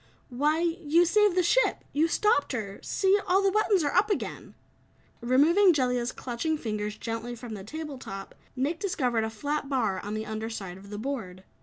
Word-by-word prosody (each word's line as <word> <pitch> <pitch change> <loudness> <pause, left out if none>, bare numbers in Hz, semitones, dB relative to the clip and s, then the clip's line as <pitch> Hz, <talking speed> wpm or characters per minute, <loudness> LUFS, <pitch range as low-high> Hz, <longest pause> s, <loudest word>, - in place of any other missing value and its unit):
"Why, 295 +6 +1
you 340 -1 +2
saved 415 +1 +3
the 365 - +4
ship. - - +2
You 310 +3 +3
stopped 330 -6 +2
her. 200 -5 -4
See, 390 +1 +2
all 380 +2 +3
the 390 - +3
buttons 415 -3 +2
are 290 - 0
up 425 - +3
again!" 405 - -3 0.7
Removing 320 +11 +5
Jellia's 250 -3 0
clutching 265 +6 -2
fingers 210 -4 -3
gently 230 +1 -4
from 235 -1 -8
the 200 -2 -7
table 300 +4 -6
top, 195 -4 -8 0.2
Nick 285 +6 -1
discovered 250 - 0
a 220 - -1
flat 285 +6 -3
bar 220 -9 0
on 205 +2 -5
the 215 0 -3
under 220 +1 -4
side 190 -5 -6
of 200 +1 -14
the 205 - -6
board. 215 -7 -5
265 Hz, 185 wpm, -28 LUFS, 220-335 Hz, 0.7 s, Removing